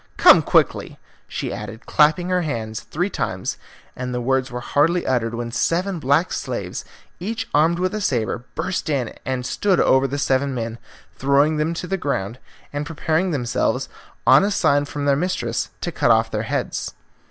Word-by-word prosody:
Come -, -, +8 dB
quickly," -, -, +1 dB, 0.3 s
she -, -, -4 dB
added, 105 Hz, +2 st, -7 dB
clapping 160 Hz, +4 st, +3 dB
her 180 Hz, 0 st, +2 dB
hands 115 Hz, -8 st, -3 dB
three 180 Hz, +6 st, -3 dB
times, 95 Hz, 0 st, -3 dB, 0.4 s
and 125 Hz, 0 st, -4 dB
the 125 Hz, -, -2 dB
words 130 Hz, +1 st, 0 dB
were 125 Hz, -1 st, -5 dB
hardly 160 Hz, +7 st, +1 dB
uttered 120 Hz, -3 st, 0 dB
when 120 Hz, 0 st, -4 dB
seven 175 Hz, +8 st, 0 dB
black 145 Hz, +5 st, +2 dB
slaves, -, -, -4 dB, 0.4 s
each 225 Hz, +5 st, -3 dB
armed 165 Hz, +3 st, +3 dB
with 185 Hz, +3 st, -1 dB
a 215 Hz, -, -2 dB
sabre, 120 Hz, -, -1 dB
burst 185 Hz, -3 st, -2 dB
in 135 Hz, -6 st, -1 dB
and 130 Hz, -1 st, -2 dB
stood 195 Hz, +6 st, +1 dB
over 130 Hz, +1 st, +4 dB
the 140 Hz, +2 st, -3 dB
seven 135 Hz, -1 st, +1 dB
men, 115 Hz, -1 st, -4 dB, 0.4 s
throwing 140 Hz, +3 st, +3 dB
them 155 Hz, +2 st, 0 dB
on 180 Hz, -, -6 dB
the 195 Hz, -, 0 dB
ground, 120 Hz, -, -2 dB, 0.3 s
and 145 Hz, 0 st, -2 dB
preparing 160 Hz, +3 st, 0 dB
themselves, 130 Hz, -8 st, -1 dB, 0.4 s
on -, -, +7 dB
a 200 Hz, -, +2 dB
sign 145 Hz, -7 st, +2 dB
from 145 Hz, 0 st, -4 dB
their 140 Hz, -1 st, +4 dB
mistress, 140 Hz, -8 st, -1 dB
to 175 Hz, -, -2 dB
cut 135 Hz, -, +1 dB
off 115 Hz, 0 st, +4 dB
their 105 Hz, -, -1 dB
heads. -, -, -2 dB
140 Hz, 175 wpm, -22 LUFS, 120-170 Hz, 0.4 s, Come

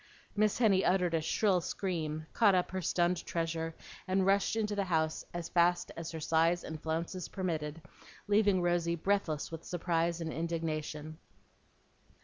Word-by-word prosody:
Miss 215 Hz, 0 st, +2 dB
Henny 205 Hz, -6 st, +4 dB
uttered 180 Hz, -2 st, +2 dB
a 165 Hz, -, +2 dB
shrill 185 Hz, +3 st, +2 dB
scream, 160 Hz, -4 st, -3 dB
caught 205 Hz, -4 st, +5 dB
up 180 Hz, -, +1 dB
her 190 Hz, 0 st, -2 dB
stunned 175 Hz, 0 st, +1 dB
treasure, 165 Hz, -1 st, -2 dB, 0.3 s
and 190 Hz, 0 st, +2 dB
rushed 195 Hz, +2 st, +3 dB
into 210 Hz, -2 st, 0 dB
the 200 Hz, -1 st, 0 dB
house 160 Hz, -3 st, 0 dB
as 175 Hz, -1 st, -4 dB
fast 175 Hz, 0 st, +2 dB
as 165 Hz, -1 st, -5 dB
her 165 Hz, -, -5 dB
size 165 Hz, +3 st, +2 dB
and 155 Hz, -1 st, -6 dB
flounces 165 Hz, +2 st, -3 dB
permitted, 165 Hz, -4 st, -3 dB, 0.4 s
leaving 205 Hz, -3 st, +3 dB
Rosy 175 Hz, -1 st, +1 dB
breathless 170 Hz, -4 st, -1 dB
with 165 Hz, 0 st, -7 dB
surprise 170 Hz, -1 st, 0 dB
and 160 Hz, -2 st, -3 dB
indignation. 155 Hz, -2 st, -3 dB
170 Hz, 150 wpm, -32 LUFS, 160-185 Hz, 0.4 s, caught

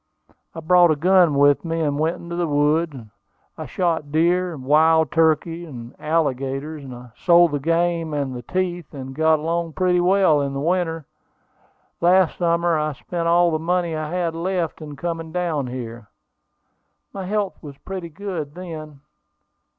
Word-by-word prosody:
I 165 Hz, -, -6 dB
brought 175 Hz, +1 st, +5 dB
a 155 Hz, -, +3 dB
gun 175 Hz, 0 st, +4 dB
with 145 Hz, 0 st, +4 dB
me, 165 Hz, -1 st, -2 dB
and 145 Hz, -2 st, -1 dB
went 160 Hz, +3 st, +1 dB
into 170 Hz, 0 st, -7 dB
the 175 Hz, -1 st, -1 dB
woods. 150 Hz, +1 st, +1 dB, 0.6 s
I -, -, -7 dB
shot 165 Hz, -5 st, -1 dB
deer, 170 Hz, +2 st, +1 dB
wild 155 Hz, +3 st, +3 dB
turkeys, 165 Hz, +1 st, +1 dB
and 120 Hz, -4 st, -9 dB
alligators. 145 Hz, -1 st, -2 dB
I 125 Hz, -1 st, -11 dB
sold 175 Hz, -2 st, +4 dB
the 145 Hz, -, -1 dB
game 165 Hz, +1 st, 0 dB
and 140 Hz, -3 st, -2 dB
the 120 Hz, -, -6 dB
teeth, 175 Hz, +2 st, -3 dB
and 135 Hz, -1 st, -7 dB
got 160 Hz, +2 st, +3 dB
along 165 Hz, +1 st, -2 dB
pretty 180 Hz, 0 st, +2 dB
well 180 Hz, -5 st, +4 dB
in 140 Hz, -1 st, -2 dB
the 140 Hz, -, -3 dB
winter. 165 Hz, 0 st, -1 dB, 1.0 s
Last 180 Hz, 0 st, +3 dB
summer 170 Hz, -1 st, +2 dB
I 150 Hz, 0 st, -1 dB
spent 170 Hz, +4 st, -4 dB
all 170 Hz, 0 st, +4 dB
the 155 Hz, -, 0 dB
money 170 Hz, 0 st, -1 dB
I 155 Hz, -1 st, -4 dB
had 175 Hz, -2 st, -1 dB
left 170 Hz, -1 st, -2 dB
in 150 Hz, -2 st, -8 dB
coming 165 Hz, +1 st, -4 dB
down 165 Hz, -6 st, -1 dB
here. 120 Hz, -3 st, -7 dB, 1.1 s
My 195 Hz, -2 st, -5 dB
health 205 Hz, -1 st, -2 dB
was 145 Hz, -3 st, -10 dB
pretty 185 Hz, -1 st, -7 dB
good 165 Hz, -4 st, -6 dB
then. 155 Hz, -5 st, -8 dB
165 Hz, 160 wpm, -22 LUFS, 145-175 Hz, 1.1 s, brought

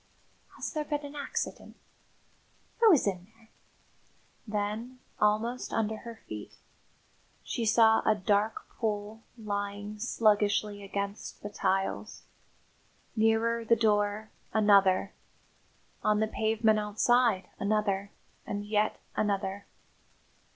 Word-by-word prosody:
"Has -, -, -4 dB
there 305 Hz, -2 st, -1 dB
been 295 Hz, -1 st, -3 dB
an 285 Hz, +1 st, -9 dB
accident? 285 Hz, -, -4 dB, 1.0 s
Who 455 Hz, -2 st, +7 dB
is 310 Hz, -, +4 dB
in 185 Hz, -2 st, -2 dB
there?" 225 Hz, -1 st, -23 dB, 1.0 s
Then, 215 Hz, +4 st, -3 dB, 0.2 s
almost 215 Hz, +4 st, +1 dB
under 220 Hz, -1 st, 0 dB
her 230 Hz, 0 st, -10 dB
feet, 105 Hz, -1 st, -8 dB, 0.9 s
she 230 Hz, -2 st, -2 dB
saw 220 Hz, 0 st, +5 dB
a 215 Hz, -, +3 dB
dark 205 Hz, +2 st, 0 dB
pool 215 Hz, -1 st, -3 dB, 0.2 s
lying 205 Hz, -1 st, -4 dB
sluggishly 210 Hz, -2 st, +2 dB
against 200 Hz, +1 st, -5 dB
the 205 Hz, -, -5 dB
tiles; 195 Hz, -1 st, -1 dB, 0.9 s
nearer 225 Hz, +1 st, +2 dB
the 230 Hz, +1 st, +4 dB
door 210 Hz, -1 st, +1 dB, 0.2 s
another 200 Hz, -3 st, +4 dB, 0.9 s
on 210 Hz, 0 st, +3 dB
the 220 Hz, -, +3 dB
pavement 220 Hz, 0 st, +2 dB
outside 215 Hz, 0 st, +2 dB
another 200 Hz, -1 st, 0 dB, 0.3 s
and 205 Hz, 0 st, -4 dB
yet 210 Hz, 0 st, 0 dB, 0.2 s
another. 200 Hz, -1 st, -1 dB
215 Hz, 105 wpm, -30 LUFS, 205-225 Hz, 1.0 s, Who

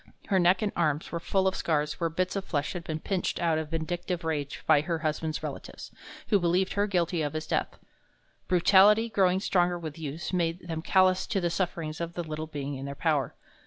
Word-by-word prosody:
Her 195 Hz, -2 st, +3 dB
neck 180 Hz, +3 st, +4 dB
and 205 Hz, -, 0 dB
arms 155 Hz, -2 st, 0 dB
were 170 Hz, -, -2 dB
full 190 Hz, +3 st, +1 dB
of 190 Hz, -, +1 dB
scars 150 Hz, -2 st, -1 dB
where 165 Hz, -1 st, +1 dB
bits 180 Hz, +4 st, -1 dB
of 195 Hz, -, -2 dB
flesh 145 Hz, -5 st, -2 dB
had 175 Hz, -2 st, -5 dB
been 155 Hz, -2 st, -4 dB
pinched 185 Hz, +2 st, -2 dB
out 165 Hz, -2 st, +2 dB
in 160 Hz, -, -4 dB
vindictive 170 Hz, +2 st, -3 dB
rage 150 Hz, -3 st, -3 dB
by 155 Hz, -2 st, +5 dB
her 165 Hz, +1 st, -2 dB
husband's 155 Hz, 0 st, -2 dB
relatives, -, -, -7 dB, 0.4 s
who 205 Hz, -, +4 dB
believed 180 Hz, +2 st, +1 dB
her 205 Hz, +1 st, +1 dB
guilty 175 Hz, -3 st, 0 dB
of 150 Hz, -1 st, -2 dB
his 155 Hz, 0 st, -3 dB
death. -, -, -2 dB, 0.7 s
Brutality, 200 Hz, +5 st, +5 dB
growing 190 Hz, -3 st, +3 dB
stronger 175 Hz, -2 st, +1 dB
with 160 Hz, -2 st, -7 dB
use, 155 Hz, +4 st, -5 dB
made 170 Hz, 0 st, -1 dB
them 160 Hz, -1 st, -3 dB
callous 185 Hz, +1 st, +3 dB
to 215 Hz, -4 st, 0 dB
the 175 Hz, -2 st, 0 dB
sufferings 165 Hz, -3 st, -2 dB
of 170 Hz, 0 st, -4 dB
the 175 Hz, -, -2 dB
little 155 Hz, 0 st, -5 dB
being 145 Hz, -2 st, -5 dB
in 135 Hz, 0 st, -5 dB
their 140 Hz, -, -5 dB
power. 145 Hz, -5 st, 0 dB
170 Hz, 210 wpm, -28 LUFS, 155-185 Hz, 0.7 s, by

